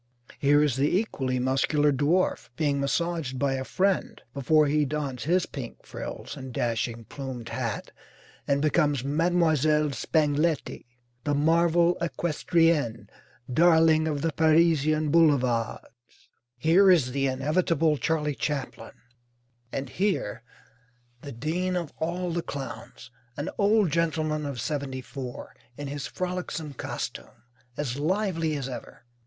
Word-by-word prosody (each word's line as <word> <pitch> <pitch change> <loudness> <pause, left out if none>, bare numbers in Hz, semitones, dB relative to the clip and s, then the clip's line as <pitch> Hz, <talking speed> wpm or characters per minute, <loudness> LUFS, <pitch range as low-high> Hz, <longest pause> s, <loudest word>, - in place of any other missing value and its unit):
Here 145 +1 +4
is 140 -4 +1
the 145 +6 +2
equally 135 - -1
muscular 135 +3 +2
dwarf, 150 +7 +1
being 145 -3 0
massaged 150 -1 -1
by 140 0 +1
a 130 0 -2
friend 190 +4 0
before 150 +3 +3
he 150 +1 +2
dons 140 -3 -3
his 180 +3 +2
pink 130 -5 -8
frills - - -7
and 130 -1 -8
dashing 115 -1 -2
plumed 130 -3 -7
hat 120 -5 -4 0.6
and 140 +1 +1
becomes 145 -4 +2
Mlle. 155 -1 +2
Spangletti, 150 0 0 0.4
"the 145 - 0
marvel 170 +3 +3
equestrienne, 165 -4 +1 0.4
darling 160 0 +5
of 145 -3 -2
the 165 - +1
Parisian 155 -1 +3
boulevards." 125 -6 0 0.3
Here 170 +9 +5
is 155 -9 +4
the 135 +1 0
inevitable 155 +3 +1
Charley 150 -1 0
Chaplin, 135 -5 -4 0.8
and 135 0 -3
here 180 - -1 0.8
the 140 - -8
dean 165 +9 -2
of 170 -4 -3
all 175 +2 -2
the 170 +1 -1
clowns, 135 -3 -8 0.3
an 145 - -3
old 205 -3 +3
gentleman 155 -2 0
of 135 -4 -5
seventy 140 0 -3
four, 130 -1 -8 0.2
in 145 -1 -5
his 140 0 -4
frolicsome 180 -4 -4
costume, 120 -3 -6 0.3
as 140 -2 -3
lively 165 -1 0
as 135 -2 -4
ever. 125 -1 -9
150 Hz, 125 wpm, -27 LUFS, 135-165 Hz, 0.8 s, darling